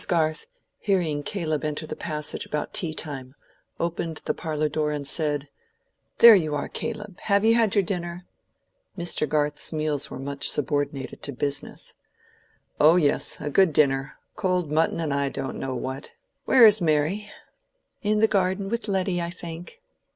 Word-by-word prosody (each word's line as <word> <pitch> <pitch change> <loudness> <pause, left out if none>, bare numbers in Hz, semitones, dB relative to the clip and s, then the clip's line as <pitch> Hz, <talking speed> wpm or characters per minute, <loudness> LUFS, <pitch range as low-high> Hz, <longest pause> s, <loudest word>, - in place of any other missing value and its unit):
Garth, 160 - 0 0.3
hearing 175 -8 0
Caleb 155 -2 -2
enter 150 +1 -3
the - - -6
passage 150 -2 -4
about 150 - -4
tea 170 -4 0
time, 140 -4 -6 0.4
opened 165 -1 -2
the - - 0
parlor 155 -1 -2
door 150 0 -1
and 145 -2 -4
said, 150 -2 0 0.7
"There 235 -1 +10
you 155 -7 +2
are, 145 - -2
Caleb. 210 -4 -5
Have 200 0 +2
you 225 - +6
had 225 -3 +3
your 200 - +4
dinner?" 175 -1 -4 0.7
(Mr. 170 -4 0
Garth's 150 0 -1
meals 155 -3 -2
were - - -7
much 140 +1 -1
subordinated 145 -1 -2
to 145 - -3
"business.") 140 +2 -4 0.9
"Oh 155 +3 +7
yes, 150 -2 +1
a 150 - -4
good 185 0 +4
dinner—cold 150 +5 0
mutton 160 +2 +1
and 155 -4 -1
I 140 0 0
don't 135 - -5
know 135 -1 -3
what. 130 +3 -5 0.3
Where 255 -3 +7
is 215 -2 +6
Mary?" 165 +6 +1 0.7
"In 210 0 +1
the 220 - +6
garden 195 -1 0
with 235 +1 -2
Letty, 190 -3 0
I 170 - -3
think." 175 - -9
155 Hz, 160 wpm, -25 LUFS, 145-190 Hz, 0.9 s, There